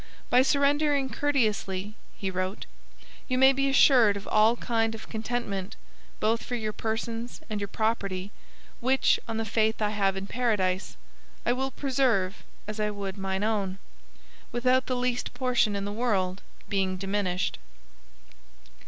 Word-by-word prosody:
'By 250 - +7
surrendering 280 0 +2
courteously,' 215 -8 0 0.2
he 190 -1 -2
wrote, 185 +1 -3 0.6
'you 255 - 0
may 265 +1 +7
be 275 +1 +1
assured 245 -6 +6
of 200 - -9
all 220 +2 +5
kind 225 -2 0
of 220 - -10
contentment, 220 -4 -3 0.4
both 225 +2 +1
for 245 - -3
your 215 -2 -3
persons 230 +2 -3
and 210 -1 -2
your 200 - -2
property, 200 -3 -1 0.5
which, 260 +2 +3
on 225 -1 -3
the 225 - -1
faith 220 +1 +1
I 210 -1 +1
have 195 -2 +1
in 195 - -4
Paradise, 195 - 0 0.5
I 240 - +3
will 265 +2 -1
preserve 250 -9 0 0.3
as 215 0 -5
I 210 0 +1
would 200 -2 -5
mine 190 0 -2
own, 200 -3 0 0.7
without 255 +2 +2
the 255 - 0
least 245 0 -1
portion 245 -5 +2
in 200 0 -2
the 205 - -4
world 200 -5 0 0.3
being 190 -2 0
diminished.' 190 -1 -1
220 Hz, 145 wpm, -27 LUFS, 195-250 Hz, 0.7 s, By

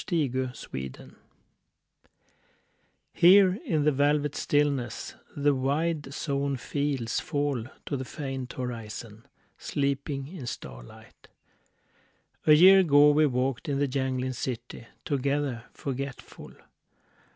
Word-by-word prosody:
THE 170 -6 +1
INDIA 130 -1 -2 0.2
WHARF 65 -1 -7 2.0
HERE 185 +1 +6
in 165 - 0
the 150 - +4
velvet 145 +1 +1
stillness 145 -4 0 0.2
The 145 0 +3
wide 145 +2 -1
sown 140 -1 -2
fields 135 -3 -2
fall 145 -5 -2 0.2
to - - -2
the 130 - -3
faint 135 -2 -6
horizon, 115 -1 -7 0.3
Sleeping 140 -1 -2
in 155 -6 -8
starlight.... - - -10 1.2
A 155 - +8
year 185 +5 +8
ago 150 -4 +6
we 150 +1 +4
walked 130 +3 -1
in 140 - 0
the 145 0 +1
jangling 130 -1 -2
city 120 -1 -6 0.2
Together.... 140 -4 -1
forgetful. 135 -1 -7
140 Hz, 105 wpm, -27 LUFS, 130-145 Hz, 2.0 s, A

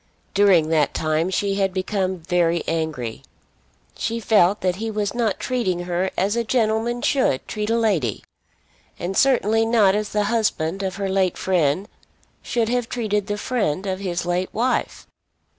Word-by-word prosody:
During 190 -6 +4
that 155 -3 +1
time 155 +2 0
she 195 +1 0
had 195 -1 +2
become 190 0 -1
very 170 -1 +1
angry. 155 -9 -3 0.7
She 230 +1 -2
felt 205 -3 +3
that 185 -1 0
he 225 +2 -3
was 210 -2 -2
not 230 -5 0
treating 190 -9 -1
her 175 +1 -1
as 200 +3 +1
a 235 - 0
gentleman 230 0 0
should 260 - +1
treat 210 0 -3
a 230 - +2
lady, 185 - 0 0.7
and 180 +3 -4
certainly 225 -4 +3
not 225 -4 +4
as 210 0 -1
the 210 0 0
husband 200 -5 0
of 190 -1 -3
her 200 -1 -2
late 190 -2 +1
friend 180 0 +1 0.5
should 235 -3 -1
have 245 -1 -1
treated 210 -4 -1
the 205 -1 -2
friend 205 - -1
of 190 -1 -2
his 175 -3 -3
late 175 +1 -1
wife. 245 +4 -1
195 Hz, 160 wpm, -22 LUFS, 175-220 Hz, 0.7 s, During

